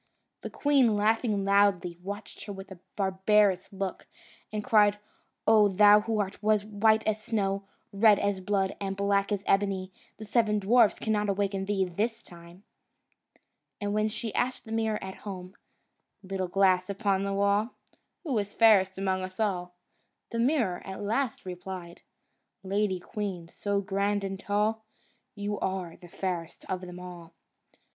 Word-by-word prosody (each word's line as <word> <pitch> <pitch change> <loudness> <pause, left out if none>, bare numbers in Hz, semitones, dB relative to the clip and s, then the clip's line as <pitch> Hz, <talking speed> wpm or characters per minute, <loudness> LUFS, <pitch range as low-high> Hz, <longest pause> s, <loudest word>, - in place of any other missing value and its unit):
The - - -5
queen, 270 -7 +3
laughing 210 -1 +1
loudly, 195 -3 +2
watched 200 +1 -7
her 205 - -6
with 195 0 -10
a 185 - -10 0.2
barbarous 190 0 +2
look, 195 -1 -5 0.4
and 210 -1 -3
cried, 210 -2 +4 0.5
"O 215 -1 +6
thou 205 +2 +6
who 220 +1 -2
art 200 -1 -3
white 215 +1 +2
as 215 0 0
snow, 200 -3 -1 0.3
red 210 +1 +6
as 200 -1 0
blood, 195 0 0
and 195 -1 -3
black 200 0 +1
as 200 -1 -1
ebony, 195 -1 +1 0.3
the 220 - -8
seven 215 -1 +2
dwarfs 220 +2 +4
cannot 210 -2 0
awaken 195 -1 -1
thee 195 -1 +1
this 220 +6 -2
time!" 170 +2 -15 1.2
And 205 -1 -2
when 215 +1 +1
she 225 0 -5
asked 255 +1 -1
the 220 - -10
mirror 220 -1 0
at 190 0 -7
home, 185 -2 -8 0.7
"Little 190 -1 -3
glass 185 0 +2
upon 200 -1 0
the 200 0 -2
wall, 200 +3 +1 0.5
Who 290 -8 -2
is 205 0 -5
fairest 195 -5 +5
among 190 -1 0
us 185 +1 -7
all?" 180 -4 -1 0.6
the 230 - -2
mirror 235 - +1
at 190 0 -7
last 225 +2 -1
replied, 180 -1 -7 0.6
"Lady 195 -1 0
queen, 180 -3 -5
so 200 +2 -2
grand 200 +1 -1
and 195 -1 -4
tall, 210 +2 0 0.5
You 205 0 -3
are 185 -3 -3
the 175 - -14
fairest 175 -2 -5
of 185 -1 -3
them 180 -1 -9
all." 175 -2 -10
200 Hz, 150 wpm, -28 LUFS, 190-215 Hz, 1.2 s, O